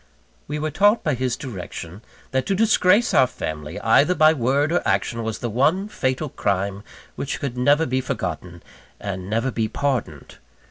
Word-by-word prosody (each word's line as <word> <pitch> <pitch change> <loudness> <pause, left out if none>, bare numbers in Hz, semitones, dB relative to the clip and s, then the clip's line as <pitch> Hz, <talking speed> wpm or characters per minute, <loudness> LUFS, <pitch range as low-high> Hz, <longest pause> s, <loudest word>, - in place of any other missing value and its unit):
We 150 - -3
were 155 +1 -2
taught 205 +8 +3
by 155 - +1
his 125 -1 -1
direction, 95 - -7 0.3
that 130 0 0
to 195 - +1
disgrace 210 0 +3
our 130 - +5
family, 75 -8 -6
either 140 - +4
by 155 -1 +6
word 140 +3 +1
or 175 - +2
action, 115 0 0
was 110 -1 -3
the 120 - -4
one 155 - +2
fatal 140 -5 -2
crime 100 -2 -1 0.3
which 140 - -4
could 135 -4 -4
never 145 +5 +3
be 130 +1 0
forgotten 90 -5 -5 0.4
and 95 -2 -5
never 115 +5 0
be 115 -2 -1
pardoned. 120 - -3
130 Hz, 170 wpm, -22 LUFS, 100-150 Hz, 0.4 s, by